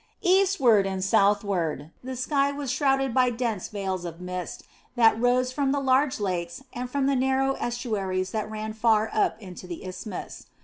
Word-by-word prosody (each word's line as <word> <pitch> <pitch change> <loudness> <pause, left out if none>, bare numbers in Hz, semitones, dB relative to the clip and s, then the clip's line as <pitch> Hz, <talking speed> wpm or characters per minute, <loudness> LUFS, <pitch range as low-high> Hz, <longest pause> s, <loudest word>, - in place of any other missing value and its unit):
Eastward 360 - +4
and 190 -1 -3
southward 195 -6 +1
the 260 +1 -5
sky 275 +2 +1
was 280 -2 -4
shrouded 270 -2 +1
by 255 0 +4
dense 230 -5 -2
veils 190 -3 -3
of 170 -1 -7
mist 180 -1 -6 0.3
that 225 -2 +4
rose 250 +1 +2
from 275 0 0
the 285 - +1
large 265 0 +2
lakes 180 +2 -3
and 250 +1 -4
from 275 +1 0
the 275 0 +2
narrow 265 +1 +2
estuaries 195 -6 -2
that 215 -1 -3
ran 215 0 -5
far 220 -1 +2
up 215 - +1
into 185 -3 -10
the 175 +1 -7
isthmus. 185 +1 -7
225 Hz, 170 wpm, -26 LUFS, 190-265 Hz, 0.3 s, Eastward